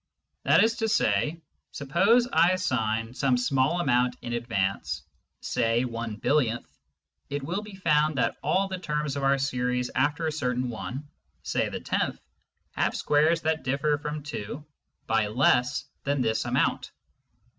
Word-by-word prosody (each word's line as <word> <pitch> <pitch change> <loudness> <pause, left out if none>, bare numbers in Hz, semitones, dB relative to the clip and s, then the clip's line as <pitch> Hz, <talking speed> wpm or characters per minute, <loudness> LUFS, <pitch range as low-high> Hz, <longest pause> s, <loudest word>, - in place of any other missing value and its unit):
That - - +6
is 225 +1 +1
to 225 -2 0
say, 150 - +1 0.3
suppose 200 - +3
I 170 +3 +5
assign 115 -10 -1
some 130 -1 +2
small 135 +6 +1
amount 125 -5 +2
in 120 - -4
advance, 95 - -2 0.4
say 120 0 +1
one 115 -2 -4
billionth, 120 0 0 0.5
it 145 0 -3
will 175 +8 -2
be 210 -2 -10
found 155 -4 +2
that 125 - +1
all 185 +7 +1
the 190 -1 -5
terms 150 -4 -2
of 140 - -2
our 135 0 +3
series 125 -2 -1
after 145 +4 +1
a 160 - 0
certain 125 -4 -1
one, 115 +7 -6 0.4
say - - 0
the - - -5
tenth, - - -1 0.5
have - - 0
squares 155 +3 +2
that 160 0 0
differ 140 +3 0
from 150 0 -5
2 145 0 -6 0.4
by 110 -1 +1
less 125 +3 +2 0.2
than 140 -1 0
this 110 -2 0
amount. - - 0
135 Hz, 150 wpm, -27 LUFS, 120-155 Hz, 0.5 s, That